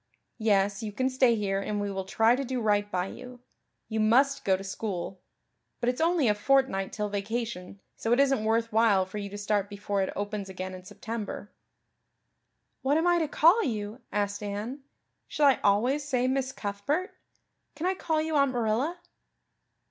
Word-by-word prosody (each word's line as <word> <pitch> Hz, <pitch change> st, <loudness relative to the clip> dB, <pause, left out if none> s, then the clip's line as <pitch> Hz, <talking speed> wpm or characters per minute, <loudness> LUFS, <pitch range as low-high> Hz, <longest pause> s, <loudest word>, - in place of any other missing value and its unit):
Yes, 200 Hz, -2 st, +2 dB
you 215 Hz, -2 st, -4 dB
can 260 Hz, +5 st, 0 dB
stay 255 Hz, -2 st, +4 dB
here 195 Hz, -2 st, -1 dB
and 205 Hz, +1 st, -2 dB
we 205 Hz, 0 st, -2 dB
will 190 Hz, -1 st, -4 dB
try 225 Hz, +5 st, +3 dB
to 275 Hz, -, -2 dB
do 260 Hz, -1 st, -2 dB
right 205 Hz, -2 st, +1 dB
by 180 Hz, -2 st, -1 dB
you. 250 Hz, +5 st, -10 dB, 0.5 s
You 220 Hz, -1 st, -2 dB
must 265 Hz, +6 st, +3 dB
go 190 Hz, -1 st, +3 dB
to 195 Hz, -, -8 dB
school; 190 Hz, -2 st, -4 dB, 0.6 s
but 240 Hz, -, +1 dB
it's 250 Hz, +4 st, -2 dB
only 330 Hz, -5 st, +3 dB
a 210 Hz, -, +4 dB
fortnight 210 Hz, -3 st, +1 dB
till 210 Hz, -1 st, -2 dB
vacation 205 Hz, -2 st, -4 dB, 0.2 s
so 225 Hz, -, -2 dB
it 240 Hz, -, +4 dB
isn't 270 Hz, -5 st, +3 dB
worth 225 Hz, +1 st, +1 dB
while 215 Hz, -4 st, +4 dB
for 190 Hz, +3 st, -6 dB
you 200 Hz, -1 st, -5 dB
to 205 Hz, -, -7 dB
start 205 Hz, -1 st, 0 dB
before 200 Hz, -1 st, -2 dB
it 190 Hz, -, -1 dB
opens 205 Hz, -1 st, -4 dB
again 185 Hz, 0 st, -6 dB
in 185 Hz, 0 st, -9 dB
September." 210 Hz, +1 st, -6 dB, 1.3 s
"What 280 Hz, +3 st, +2 dB
am 325 Hz, -, +1 dB
I 350 Hz, 0 st, +4 dB
to 320 Hz, -, 0 dB
call 335 Hz, +9 st, +5 dB
you?" 215 Hz, -1 st, -3 dB
asked 205 Hz, 0 st, -1 dB
Anne. 210 Hz, +6 st, -4 dB, 0.5 s
"Shall 295 Hz, -, +1 dB
I 270 Hz, -5 st, +5 dB
always 245 Hz, +9 st, +2 dB
say 255 Hz, -3 st, 0 dB
Miss 265 Hz, 0 st, 0 dB
Cuthbert? 265 Hz, -, -2 dB, 0.6 s
Can 320 Hz, -, -4 dB
I 375 Hz, -, +2 dB
call 320 Hz, -4 st, -1 dB
you 315 Hz, 0 st, -1 dB
Aunt 280 Hz, -2 st, +3 dB
Marilla?" 245 Hz, +8 st, 0 dB
220 Hz, 185 wpm, -28 LUFS, 200-265 Hz, 1.3 s, call